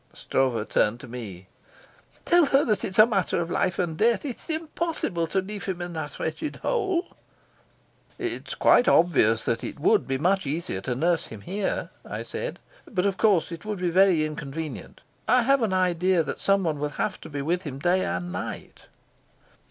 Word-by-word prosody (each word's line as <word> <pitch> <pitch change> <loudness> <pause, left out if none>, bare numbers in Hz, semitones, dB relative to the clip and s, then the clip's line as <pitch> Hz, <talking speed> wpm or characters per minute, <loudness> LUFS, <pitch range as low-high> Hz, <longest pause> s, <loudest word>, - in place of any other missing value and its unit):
Stroeve 125 -5 0
turned 105 +3 +1
to - - -10
me. 105 -7 -8 0.8
"Tell 345 -2 +5
her 275 +1 +3
that 215 -3 0
it's 190 - -4
a 215 - +9
matter 195 -7 0
of 170 0 -3
life 185 - 0
and 170 -3 -1
death. 230 - +2
It's 265 +4 -6
impossible 315 - -2
to 190 +4 0
leave 200 -1 -7
him 185 -2 -3
in 175 0 -5
that 155 -3 -5
wretched 160 - -3
hole." 385 -8 -1 1.0
"It's - - -4
quite 245 - +5
obvious 115 -10 +4
that 115 -1 -1
it - - -6
would - - +3
be 135 - 0
much 185 +3 +1
easier 145 - -3
to 125 +5 -2
nurse 165 +4 +1
him 110 -3 -10
here," 195 - -3
I - - -5
said, - - -5 0.3
"but 185 -4 0
of 195 -1 0
course 200 -7 +3
it 165 -1 -7
would 210 -1 -3
be 180 -1 -1
very 180 -3 +4
inconvenient. 155 0 -6 0.3
I 250 -1 +4
have 275 +2 +3
an 220 -4 +1
idea 180 -1 +2
that - - -5
someone 185 -7 +1
will 150 0 -1
have 195 - -2
to - - -9
be 145 -2 -4
with 175 +4 0
him 145 -6 -6
day 180 +6 +2
and 90 0 -3
night." 90 - -7
175 Hz, 185 wpm, -26 LUFS, 145-210 Hz, 1.0 s, a